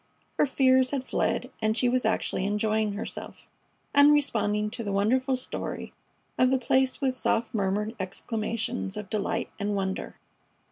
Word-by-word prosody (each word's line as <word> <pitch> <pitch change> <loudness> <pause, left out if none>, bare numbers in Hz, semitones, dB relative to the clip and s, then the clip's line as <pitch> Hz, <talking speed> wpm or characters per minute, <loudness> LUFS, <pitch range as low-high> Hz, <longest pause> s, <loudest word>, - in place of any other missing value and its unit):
Her - - +5
fears 260 -1 +4
had 275 -2 -2
fled 255 0 -1
and 220 +1 +1
she 250 - +3
was 250 -1 +1
actually 220 -3 0
enjoying 210 +1 0
herself, 210 +3 -7 0.5
and 285 +1 +7
responding 210 -7 +1
to 235 0 -4
the 200 - -3
wonderful 255 +7 +2
story 255 - -4 0.5
of 255 - +5
the 265 - +3
place 260 +2 +1
with 265 -2 +2
soft 235 -2 0
murmured 210 +2 -1
exclamations 215 +2 -3
of 210 -1 -7
delight 220 +2 -1
and 205 0 -1
wonder. 190 -1 -3
225 Hz, 150 wpm, -27 LUFS, 210-255 Hz, 0.5 s, and